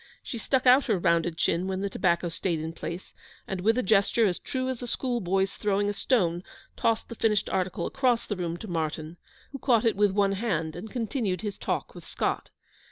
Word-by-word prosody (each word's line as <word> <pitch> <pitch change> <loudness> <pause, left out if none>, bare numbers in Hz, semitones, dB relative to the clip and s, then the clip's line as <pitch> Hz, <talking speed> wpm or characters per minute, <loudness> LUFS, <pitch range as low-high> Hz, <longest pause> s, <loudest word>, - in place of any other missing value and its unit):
She 235 - -5
stuck 260 +3 0
out 255 +2 +7
her 220 -6 +2
rounded 170 -1 +1
chin 170 +2 +1
when 190 0 -2
the 200 - 0
tobacco 175 -2 +1
stayed 165 0 -2
in 160 +1 -4
place, 170 +2 -7 0.3
and, 190 -2 -3
with 225 +5 +3
a 255 - +1
gesture 215 +3 +3
as 180 -4 0
true 255 -1 -3
as 260 -2 -3
a 245 - -4
school 245 0 -1
boy's 190 +1 +1
throwing 205 0 +1
a - - -1
stone, 180 -7 +1 0.3
tossed 225 -1 +1
the - - -7
finished 215 -2 +1
article 185 -2 -1
across 245 -3 +1
the 205 - -3
room 175 -2 -3
to 220 - -8
Martyn, 160 -1 -3 0.3
who 275 - -6
caught 245 -4 +3
it 225 - +3
with 205 +1 +4
one 195 0 +2
hand, 180 -7 -1
and 190 +6 -7
continued 220 -6 -2
his 205 -2 -5
talk - - -2
with - - -12
Scott. - - -2
195 Hz, 215 wpm, -27 LUFS, 175-230 Hz, 0.3 s, out